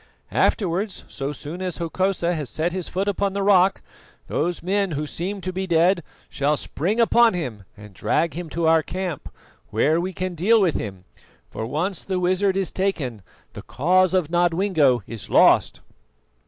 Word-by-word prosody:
Afterwards, 195 0 0
so 140 +1 -4
soon 150 +5 -7
as 180 -3 -3
Hokosa 175 +1 -1
has 150 -6 -4
set 165 +3 -1
his 185 -2 -3
foot 195 +2 -2
upon 200 0 0
the 200 0 -1
rock, 195 -1 +4 0.4
those 175 +3 -2
men 195 -1 0
who 150 +1 -2
seem 190 +6 -4
to 185 +1 -4
be 190 +1 -3
dead 170 +2 +3 0.3
shall 145 +2 0
spring 190 +13 -2
upon 230 -2 +5
him 120 - -5
and 105 -1 -13
drag 160 - 0
him 170 +1 -6
to 165 +2 -2
our 160 0 +5
camp, 180 -2 -5 0.4
where 155 +10 +2
we 185 +2 -3
can 185 0 -4
deal 205 +8 +3
with 180 -6 +2
him; 95 -3 -5 0.5
for 110 - -4
once 170 - -2
the 190 -1 -2
wizard 185 +2 +1
is 195 -2 0
taken, 145 - -2 0.3
the - - -8
cause 185 +5 +2
of 170 -4 0
Nodwengo 175 -6 +2
is 115 -3 -7
lost." - - +4
175 Hz, 170 wpm, -23 LUFS, 155-190 Hz, 0.5 s, upon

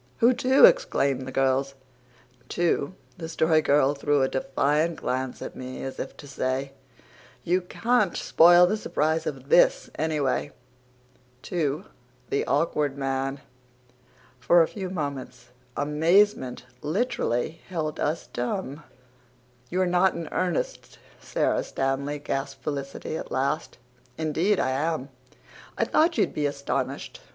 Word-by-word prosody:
"Who 240 +2 +5
to?" 260 +2 +6
exclaimed 140 - +2
the - - -5
girls. 135 +1 +1 0.7
"To" 175 -1 0 0.2
the 160 -1 -5
Story 160 -1 +3
Girl 145 -1 +3
threw 145 -1 +1
a - - +3
defiant 145 +5 0
glance 130 0 -3
at - - -7
me 130 0 -7
as 135 - -6
if - - -6
to 145 - -11
say, 135 0 -2 0.7
"You 180 +5 +1
can't 220 +1 0
spoil 175 +2 +6
the 210 +5 0
surprise 160 -5 -1
of - - -6
THIS, - - +4
anyway," 150 -3 -1 0.9
"to 155 +1 -2 0.5
the 140 - +1
Awkward 145 -2 0
Man." 135 0 -2 1.0
For 170 +6 +5
a - - -1
few 190 -3 -6
moments 140 -7 -5 0.3
amazement 150 0 +2 0.2
literally 160 - -1
held 155 -4 -3
us 155 -1 -1
dumb. 135 +5 -4 0.9
"You're 185 +1 +1
not 180 +1 +3
in 165 - -5
earnest, 180 -3 -2 0.2
Sara - - 0
Stanley?" 135 +2 -2
gasped 135 -1 -4
Felicity 140 +1 -4
at - - -7
last. 135 +1 -2 0.4
"Indeed 165 +6 +1
I 130 - +1
am. 145 0 -1 0.7
I - - +2
thought 335 +1 +2
you'd - - +1
be 150 -1 0
astonished. 140 -1 -3
150 Hz, 125 wpm, -26 LUFS, 135-175 Hz, 1.0 s, to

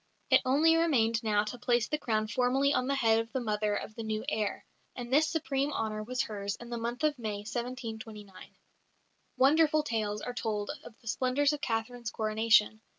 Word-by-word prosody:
It - - +7
only 305 +5 +4
remained 230 -9 +2
now 210 -2 +2
to 225 +3 -6
place 240 -2 +1
the 300 - -2
crown 215 -5 0
formally 260 +5 +2
on 255 - 0
the 275 - +1
head 225 -4 +3
of 225 0 -4
the 260 - 0
mother 210 -3 -1
of 215 - -5
the 230 - -7
new 220 0 -3
heir, 215 -8 -2 0.3
and 245 0 -6
this 310 +3 +5
supreme 285 -3 -1
honour 215 -4 -2
was 250 +4 -2
hers 200 -1 -4
in 240 0 -11
the 235 - -2
month 240 +4 -4
of 300 -3 +1
May, 210 -3 -3
1729. 225 -4 -7 0.8
Wonderful 305 +3 +4
tales 215 -6 -2
are 245 - -4
told 210 -4 -2
of 225 - -13
the 230 - -17
splendours 265 +5 +1
of 295 - -5
Catherine's 235 0 -2
coronation. 215 0 +2
235 Hz, 190 wpm, -30 LUFS, 215-265 Hz, 0.8 s, It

